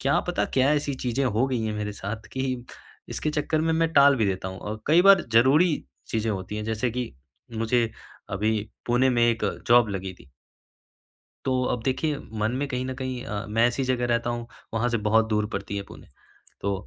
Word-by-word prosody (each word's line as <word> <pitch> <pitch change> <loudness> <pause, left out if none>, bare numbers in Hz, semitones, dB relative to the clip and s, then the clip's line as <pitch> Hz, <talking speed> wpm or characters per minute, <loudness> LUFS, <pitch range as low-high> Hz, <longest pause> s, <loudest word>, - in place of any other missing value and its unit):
क्या - - +2
पता - - +1
क्या 130 +1 +4
ऐसी 145 -1 -1
चीज़ें 125 +3 0
हो 120 +1 +1
गई 125 -4 -1
हैं 110 -1 -2
मेरे 105 0 -3
साथ 105 +2 -6
कि 130 -2 -2 0.5
इसके 155 - -2
चक्कर 150 +1 0
में 160 0 +1
मैं 165 0 +2
टाल 140 -1 +6
भी 110 - +2
देता 95 -1 -2
हूँ 95 - -7
औ 105 +1 -4
कई 165 +4 +5
बार 195 -2 +7
ज़रूरी 145 +9 +5 0.3
चीज़ें 110 0 -1
होती 95 +2 -5
हैं 105 - -3
जैसे 110 +3 -1
कि 125 0 -3 0.5
मुझे 115 0 +1 0.5
अभी 110 +2 +1 0.3
पुणे 125 +2 +3
में 120 -1 +2
एक 115 - -2 0.2
जॉब 120 -1 +6
लगी 95 -1 -4
थी। 70 - -18 1.1
तो, 130 -1 +1
अब 125 -2 -1
देखिए 140 +3 0 0.2
मन 110 - +1
में 140 +2 -1
कहीं 125 -1 -3
न 130 - -3
कहीं 130 -1 -4
अ, 105 +1 -4
मैं 115 +2 +3
ऐसी 120 +3 -1
जगह 125 -1 0
रहता 120 0 0
हूँ, 120 0 -4 0.3
वहाँ 120 +2 +1
से 115 - +1
बहुत 110 +1 +4
दूर 105 -1 +1
पड़ती 100 0 -4
है 100 - -3
पुणे। - - -13 0.5
तो 100 0 0
120 Hz, 205 wpm, -25 LUFS, 110-130 Hz, 1.1 s, बार